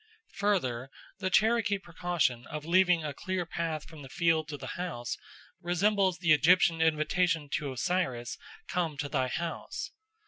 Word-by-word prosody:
Further, 135 -12 0 0.3
the 190 -2 -1
Cherokee 220 +1 +3
precaution 170 -9 -1
of 150 0 -6
leaving 180 -1 +4
a 145 - -3
clear 185 +2 -3
path 165 -2 -3
from 160 -2 -11
the 135 - -10
field 160 0 +2
to 150 -2 -5
the 130 - -8
house 160 -10 -4 0.5
resembles 190 +1 +2
the 170 -3 +4
Egyptian 165 +2 +4
invitation 160 0 +2
to 145 -1 -2
Osiris, 130 -5 -1 0.3
"Come 165 -5 -1
to 145 0 -2
thy 130 -3 0
house." 170 +6 -4
165 Hz, 145 wpm, -30 LUFS, 145-180 Hz, 0.5 s, leaving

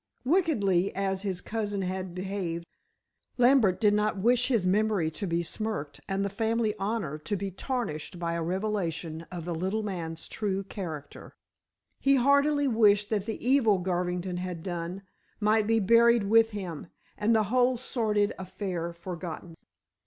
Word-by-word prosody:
Wickedly 220 - +2
as 195 -1 -1
his 190 -3 -3
cousin 205 -3 -2
had 185 -1 -4
behaved, 185 -3 -3 0.7
Lambert 240 -7 +4
did 210 -2 +4
not 210 0 +1
wish 240 +5 +3
his 230 -8 +1
memory 195 -3 +2
to 195 +5 -4
be 170 0 0
smirched 170 -6 -4
and 195 +1 0
the - - -1
family 220 +1 0
honor 195 -7 -2
to 205 +7 -2
be 195 0 -3
tarnished 190 - -4
by 170 -1 -2
a 170 - -2
revelation 170 -3 -2
of 175 -3 -6
the 175 - -2
little 190 +6 -1
man's 165 -5 -5
true 195 -2 -2
character. 165 -7 -7 0.6
He 275 0 +4
heartily 280 +2 +3
wished 210 -3 +4
that 210 -1 0
the 225 +2 -4
evil 245 -7 +4
Garvington 180 0 -2
had 180 -2 -5
done 175 +1 -4 0.4
might 215 0 +3
be 225 0 +3
buried 235 +2 +5
with 225 +2 +5
him, 185 -7 -6 0.3
and 220 +2 +2
the 220 - +4
whole 250 0 +3
sordid 215 -4 0
affair 185 -2 -4
forgotten. 170 -1 -7
195 Hz, 155 wpm, -28 LUFS, 175-220 Hz, 0.7 s, buried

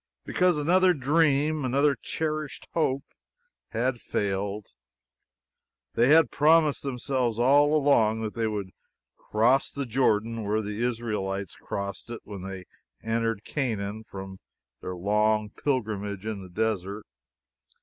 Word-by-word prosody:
Because 180 -3 +2
another 180 +4 +4
dream, 150 +1 +2
another 140 +3 +3
cherished 155 +3 -4
hope, 140 -4 +1 0.7
had 120 +1 -1
failed. 100 +1 -3 1.2
They 120 - +3
had 155 -2 +6
promised 155 0 +4
themselves 125 -3 -1
all 145 +5 +4
along 115 -7 +3
that 110 - -3
they 115 -1 -1
would 100 -3 -4 0.4
cross 120 +6 +2
the 140 -1 -4
Jordan 115 -2 +1
where 105 +2 0
the 105 +2 -4
Israelites 105 -5 -2
crossed 100 +3 -5
it 120 -1 -6
when 100 -3 -8
they 95 -1 -7 0.4
entered 115 -1 -1
Canaan 110 -6 -3
from 95 -2 -9 0.4
their 90 - -5
long 105 +3 +1
pilgrimage 105 -7 -2
in 110 -3 -4
the 95 - -10
desert. 105 0 -2
115 Hz, 120 wpm, -27 LUFS, 105-140 Hz, 1.2 s, had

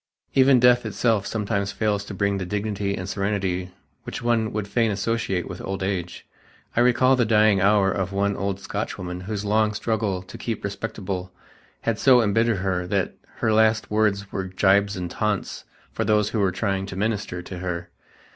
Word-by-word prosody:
Even 130 -1 +6
death 125 0 +5
itself 110 -5 0
sometimes 100 -2 -1
fails 105 -2 0
to 100 - -7
bring 100 +1 0
the 95 - -3
dignity 100 0 -2
and 90 - -5
serenity 95 -2 -1 0.3
which - - -6
one 115 -2 +1
would 105 -1 -3
fain 115 +1 +1
associate 100 -3 -1
with 90 - -7
old 95 0 -4
age. 95 -3 -3 0.5
I - - +2
recall 125 +2 +4
the 125 - +2
dying 105 -3 +4
hour 100 0 +4
of 95 0 -2
one 100 0 0
old 100 -1 -2
Scotchwoman 90 -2 -5
whose 105 0 -3
long 105 +1 +2
struggle 105 -4 -1
to - - -11
"keep 115 -3 -4
respectable" 100 -2 -4 0.5
had 115 -2 -1
so 130 -2 +6
embittered 115 0 +2
her 90 -2 -1
that 95 0 0 0.3
her 110 - +2
last 110 -1 +3
words 105 -2 +1
were 95 -1 -3
gibes 100 +2 +2
and 90 -2 -4
taunts 105 -2 -2 0.3
for - - -2
those 105 -1 +2
who 110 - -1
were 95 -2 +2
trying 95 0 -1
to 95 - -7
minister 100 -3 -2
to 90 0 -7
her. 90 -1 -4
100 Hz, 180 wpm, -24 LUFS, 95-110 Hz, 0.5 s, Even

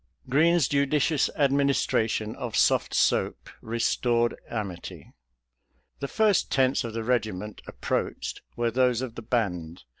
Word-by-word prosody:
Green's 160 +4 +3
judicious 140 +1 +2
administration 135 -6 +1
of 125 -5 -5
soft - - +3
soap - - +1
restored 115 +1 +1 0.2
amity. 100 -6 -6 0.9
The 140 - -3
first 215 +4 +2
tents 130 -1 +2
of 115 -2 -5
the 115 0 -3
regiment 110 -4 -2
approached - - -3
were 120 -1 0
those 125 0 +2
of 125 -3 -5
the 120 - -8
band. 90 - -2
120 Hz, 120 wpm, -26 LUFS, 110-140 Hz, 0.9 s, Green's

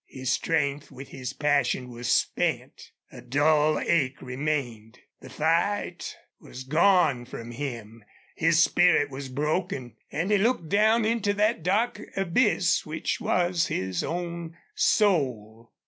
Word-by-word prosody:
His 130 -1 -4
strength 145 -3 -1
with 135 +1 -11
his 130 -2 -6
passion 145 -3 0
was 120 0 -3
spent. - - -1 0.2
A - - -11
dull 150 +3 +2
ache 140 -6 0
remained. 125 -4 -4 0.2
The 130 - -12
fight 165 +9 -1 0.2
was 130 - -10
gone 155 -3 +3
from 120 -1 -8
him. 115 -4 -7 0.3
His 165 0 +4
spirit 175 -6 +3
was 135 0 -7
broken. 140 -3 -3
And 165 +7 -2
he 205 - +4
looked 205 -7 0
down 215 +3 +3
into 220 -3 0
that 210 -1 +1
dark 210 +5 0 0.2
abyss 195 0 +2
which 155 +1 -3
was 175 -1 +1
his 95 -2 -2
own 170 -1 -5 0.2
soul. 120 - 0
155 Hz, 130 wpm, -26 LUFS, 130-180 Hz, 0.3 s, His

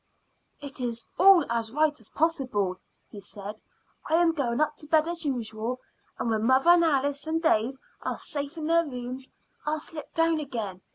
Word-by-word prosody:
"It 285 -1 -8
is 235 -2 -3
all 380 -2 +8
as 230 -1 -2
right 300 +2 +1
as - - -15
possible," 250 - 0 0.3
he 205 - -9
said. 205 +2 -7 0.5
"I 315 - +3
am 340 0 +4
going 250 -6 -1
up 305 0 +1
to 300 - -12
bed 315 +1 +3
as 340 -1 -4
usual, 235 -2 -3 0.4
and 230 - -1
when 220 -1 0
mother 260 +7 +5
and 350 -1 +6
Alice 285 -1 +1
and 320 +1 +1
Dave 265 -5 +2 0.2
are - - -3
safe 285 +2 -5
in 310 - -4
their 335 +1 +4
rooms 255 -2 -6 0.3
I'll 305 +1 -1
slip 305 0 -7
down 330 -1 +3
again. 225 -10 -5
280 Hz, 180 wpm, -27 LUFS, 235-320 Hz, 0.5 s, all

